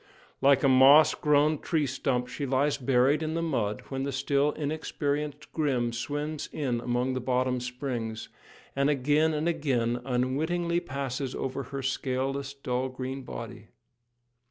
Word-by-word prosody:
Like 140 0 +5
a - - +5
moss 135 +4 +7
grown 150 0 +2
tree 160 -4 0
stump 125 -1 -1
she 140 +3 -4
lies 135 +3 +2
buried 135 +3 +2
in 160 0 -2
the 165 - -1
mud 105 -10 -1
when 135 -1 -3
the 140 +1 -2
still 140 +2 +1
inexperienced 150 -1 -3
Grim 130 -7 0
swims 145 +5 -3
in 130 -6 -1
among 125 +2 0
the 130 - -1
bottom 125 0 0
springs, 125 -3 -4 0.5
and 140 +1 +2
again 150 +3 +2
and 155 +1 -1
again 125 -8 0
unwittingly 155 +8 0
passes 135 -3 -4
over 135 +1 -3
her 135 -1 -6
scaleless, 135 +1 -2
dull 130 -1 -2
green 130 +1 -5
body. 115 -3 -8
135 Hz, 145 wpm, -28 LUFS, 125-150 Hz, 0.5 s, moss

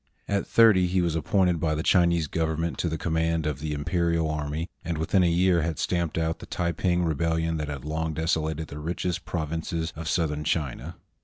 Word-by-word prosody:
At 100 -1 -1
thirty 105 -6 +5
he 95 +1 +1
was 85 -2 +1
appointed 90 +1 +2
by 75 -1 0
the 80 - -2
Chinese 85 -3 +3
Government 80 +2 -2
to 85 - 0
the 80 - -2
command 80 -1 0
of 75 -3 -2
the 75 +1 -3
Imperial 85 +1 0
army, 75 +2 -3 0.2
and 85 -2 -3
within 80 +4 +2
a 85 - +4
year 90 0 +3
had 80 0 -2
stamped 85 -3 -1
out 80 0 -1
the - - -10
Taiping 85 +1 0
Rebel 80 +1 0
lion 80 0 -1
that 75 -1 -3
had 70 -2 -6
long 80 0 -2
desolated 80 -1 -1
the 75 - -7
richest 90 +3 -3
provinces 80 0 -3
of 80 0 -5
south 80 -4 +1
ern 75 0 -4
China. 75 -4 -2
80 Hz, 205 wpm, -26 LUFS, 80-85 Hz, 0.2 s, thirty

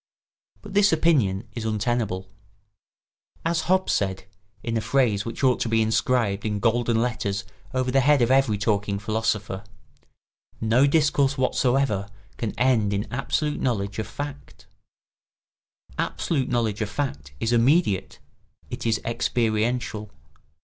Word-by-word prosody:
But - - -9
this 205 0 +5
opinion 125 - +2
is 115 0 -5
untenable. 110 -3 -1 1.2
As 165 -1 0
Hobbes 185 0 +3
said, 95 -2 -1 0.4
in 115 -1 -2
a 110 - +1
phrase 115 -4 +1
which 115 +4 -5
ought 130 -2 +4
to 115 - -1
be 115 0 +3
inscribed 110 -2 +1
in 105 -1 -1
golden 115 +1 +2
letters 100 -5 -2 0.3
over 130 -1 0
the 135 - +4
head 145 +2 +4
of 120 - +2
every 135 -6 +3
talking 105 -1 0
philosopher: 110 -1 -2 1.0
No 115 +5 +3
discourse 145 -2 +2
whatsoever 125 -5 +1 0.3
can 115 -2 -4
end 115 -4 +2
in 100 +4 -4
absolute 150 +3 -1
knowledge 100 -5 -1
of 110 - -3
fact. 145 +5 -8 1.3
Absolute 135 -6 -1
knowledge 115 -3 0
of 105 - -1
fact 75 - -4
is 115 +1 0
immediate, 120 - +2 0.5
it - - -4
is 110 -2 +2
experiential. 115 -1 -1
115 Hz, 130 wpm, -24 LUFS, 105-130 Hz, 1.3 s, this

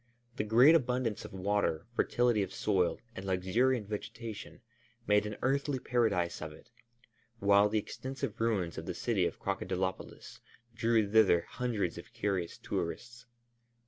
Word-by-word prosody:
The - - 0
great 120 +8 +6
abundance 125 -7 0
of - - -9
water, 95 -4 0
fertility 120 -3 +2
of 95 - -3
soil, 95 -4 +1 0.2
and 95 - -6
luxuriant 100 +6 +1
vegetation 110 +2 -7 0.4
made 105 -1 +3
an 105 - -6
earthly 140 +1 +1
paradise 110 -9 0
of 80 0 -5
it, 80 +9 -16 0.7
while 100 0 +4
the 110 - 0
extensive 130 +4 -5
ruins 100 -8 0
of - - -9
the - - -3
city - - +1
of - - -6
Crocodilopolis 95 0 -4 0.3
drew 115 -2 +2
thither 100 -5 +5
hundreds 105 -7 -3
of 110 +7 -13
curious 100 -7 -2
tourists. 120 +8 -5
105 Hz, 140 wpm, -32 LUFS, 95-120 Hz, 0.7 s, great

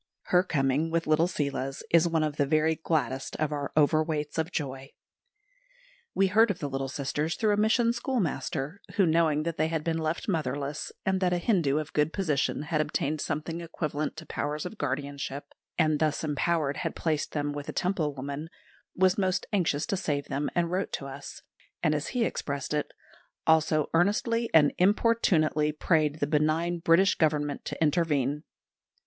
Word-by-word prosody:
Her 180 - +7
coming, 145 -3 0
with 165 0 0
little 155 +2 +3
Seela's, 140 -5 -3
is 170 0 +5
one 165 -2 +1
of 150 -1 -2
the 145 - +3
very 155 +2 +3
gladdest 155 -5 -2
of 155 -1 -1
our 145 -1 -3
Overweights 155 0 +2
of 160 +2 -1
Joy. 135 -3 -5 1.2
We 195 - +4
heard 220 +4 +4
of 200 - -1
the 145 - -3
little 135 -1 -3
sisters 145 +4 -2
through 215 -2 +2
a - - +1
mission 230 +2 +3
schoolmaster, 190 - -2
who 195 - +4
knowing 160 -2 +2
that 165 0 -3
they 155 - +2
had 160 -1 -2
been 165 0 -1
left 160 +1 -2
motherless, 145 -4 -2
and 190 0 +1
that 180 -1 +2
a - - +2
Hindu 170 -7 +2
of 155 0 -4
good 150 +1 +1
position 150 -6 0
had 155 0 0
obtained 150 0 -1
something 160 +2 -3
equivalent 155 -2 -3
to 165 - -8
powers 150 +2 -3
of 195 +4 -7
guardianship, 140 0 -3 0.3
and 155 -3 +2
thus 155 0 0
empowered 150 -1 0
had 165 -3 -3
placed 155 -3 -1
them 145 -1 -1
with 145 0 -6
a - - -1
Temple 180 -5 0
woman 140 +4 -5 0.5
was 185 +1 +3
most 185 -2 0
anxious 165 -6 +1
to - - -1
save 145 -6 -2
them, 140 +1 -1
and 170 -1 +1
wrote 185 +2 -1
to 140 - -3
us; 140 +1 -9 0.4
and, 155 - +3
as 150 -1 -2
he 245 -3 0
expressed 140 -6 -3
it, 150 -1 -1 0.5
"also 155 -1 +3
earnestly 215 +6 +2
and 150 -3 +5
importunately 180 -7 +3
prayed 155 -1 +1
the - - +1
benign 155 +4 +1
British 170 +4 +4
Government 150 -2 0
to - - -5
intervene." 150 -3 +1
155 Hz, 175 wpm, -28 LUFS, 145-175 Hz, 1.2 s, Her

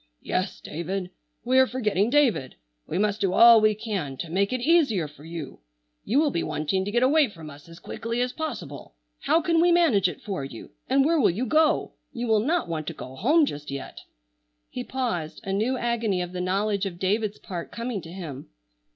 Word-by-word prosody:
"Yes, - - -2
David! 180 +3 -4 0.3
We 260 +2 +4
are 260 - +5
forgetting 215 -5 0
David! 245 - +2 0.3
We 170 - -3
must 210 +1 0
do 190 -2 +1
all 230 -1 +8
we 215 0 +3
can 200 - -4
to 160 - -6
make 200 +3 +1
it 255 - -1
easier 250 - +3
for 150 0 -16
you. 160 -3 -7 0.4
You 255 +7 +2
will 300 -2 +2
be 170 - -1
wanting 155 +5 -1
to - - -3
get 240 +3 +2
away 285 0 +4
from 160 -6 -10
us 145 +3 -14
as 165 - -12
quickly 230 +6 -4
as 250 0 0
possible. 180 - -6 0.2
How 330 - +2
can 335 0 +3
we 350 +1 +4
manage 260 - +4
it 160 - -9
for 195 -8 -4
you? 130 -4 -9 0.2
And 270 +1 +4
where 325 +1 +3
will 250 - +4
you 210 +9 -1
go? 310 +5 +2 0.2
You 240 0 -4
will 220 -2 +3
not 320 +10 0
want 160 -2 -4
to 165 - -3
go 130 -3 -9
home 295 - +4
just 150 - -6
yet?" 140 0 -7 0.7
He 250 - -4
paused, 230 -13 -3
a 195 -2 -3
new 230 +6 0
agony 230 -6 0
of 175 - -7
the 180 0 -4
knowledge 200 +2 0
of 175 -3 -7
David's 205 +3 0
part 175 -3 -7
coming 235 -3 -4
to 165 - -11
him. 160 -7 -8
210 Hz, 210 wpm, -25 LUFS, 170-255 Hz, 0.7 s, all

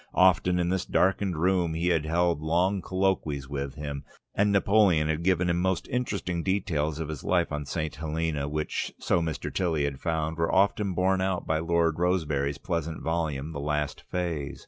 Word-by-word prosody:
Often 90 -1 +4
in 85 -1 +1
this 95 0 0
darkened 95 -2 +1
room 90 -1 +1
he 85 +2 0
had 80 -3 +1
held 85 -1 +1
long 90 +5 +1
colloquies 90 -7 -1
with 70 -1 -4
him, 70 -2 -5 0.3
and 105 +1 +2
Napoleon 100 -5 +4
had 80 +1 0
given 90 0 +2
him 85 0 +1
most 95 -1 0
interesting 100 -8 -2
details 80 -6 -1
of 80 -1 -3
his 75 -3 -6
life 90 -3 +1
on 75 -1 -3
St. 75 +3 -3
Helena, 80 -2 -2
which, 75 +1 -2
so 85 - +1
Mr. 80 -1 -3
Tilly 85 -6 0
had 70 -2 -2
found, 80 -1 -1
were 85 - +1
often 100 -1 +2
borne 95 +1 +2
out 95 -1 -1
by 80 0 +1
Lord 85 0 +1
Rosebery's 75 -6 0
pleasant 85 -1 -3
volume 80 -3 -2
The 70 - -5
Last 75 0 -2
Phase. 80 -6 -3
85 Hz, 180 wpm, -27 LUFS, 75-90 Hz, 0.3 s, Often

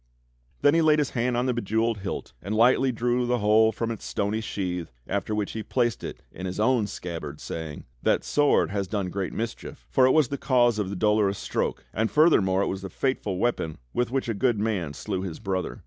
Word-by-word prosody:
Then 145 - +6
he 165 - +4
laid 155 -1 +5
his 150 -3 0
hand 120 0 0
on 125 - +1
the 130 - +1
bejewelled 110 0 0
hilt 95 -8 -5
and 100 +4 -3
lightly 125 +3 +4
drew 120 +1 0
the 125 0 +2
whole 110 +1 +4
from 115 +2 -3
its 115 - -6
stony 105 +2 -1
sheath, 90 - -3
after 100 +2 -2
which 105 -1 -2
he 110 - -4
placed 120 +1 0
it - - -7
in 95 - -6
his 90 +2 -5
own 115 -1 +3
scabbard, 80 -6 -6
saying: 80 -3 -6 0.2
"That - - +2
sword 145 - +2
has 100 -1 -2
done 95 -2 -2
great 95 -1 -2
mischief, 115 0 -6
for 130 -1 +5
it - - +4
was 150 -4 +4
the 140 - -3
cause 120 -4 +3
of 100 -3 -1
the 100 - -4
Dolorous 105 0 +2
Stroke, - - -2
and 110 +2 0
furthermore 100 - +4
it - - -1
was 95 0 -3
the 95 - -6
fateful 105 -3 -1
weapon 90 -8 -1 0.2
with 120 -1 0
which 130 0 -1
a 115 - 0
good 120 +2 +1
man 95 -9 -1
slew 95 +1 -3
his 90 -4 -5
brother. 95 -2 -3
110 Hz, 220 wpm, -26 LUFS, 95-120 Hz, 0.2 s, Then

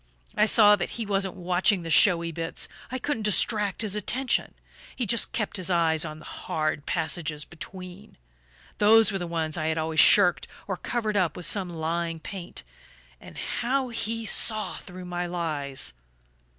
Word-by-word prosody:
I 210 - +4
saw 210 -1 +7
that - - -3
he 230 - -3
wasn't 195 -2 -1
watching 180 +1 +1
the 165 - -5
showy 170 0 +5
bits 165 0 -3 0.2
I 255 - -2
couldn't 260 -2 -3
distract 210 0 +1
his 210 -2 0
attention; 245 +5 -1 0.4
he 245 - -2
just 230 +2 +2
kept 215 -3 -2
his 185 -1 0
eyes 165 -3 +3
on 155 -2 -6
the 155 - -14
hard 155 -2 -3
passages 155 -2 -1
between. 185 +3 -11 0.6
Those 220 +1 +6
were 195 - -2
the 175 - -4
ones 160 -2 -2
I 155 - -2
had 160 0 -1
always 160 0 -1
shirked, 180 -1 +6 0.2
or 190 - -2
covered 215 +1 -2
up 175 -5 0
with 180 - -4
some 195 -3 +1
lying 165 0 -3
paint. 180 +1 -8 0.6
And - - -13
how 255 +2 -2
he 230 0 -3
saw 215 -1 +1
through 180 -1 -10
my 175 0 -4
lies! 145 - -3
180 Hz, 165 wpm, -26 LUFS, 165-210 Hz, 0.6 s, saw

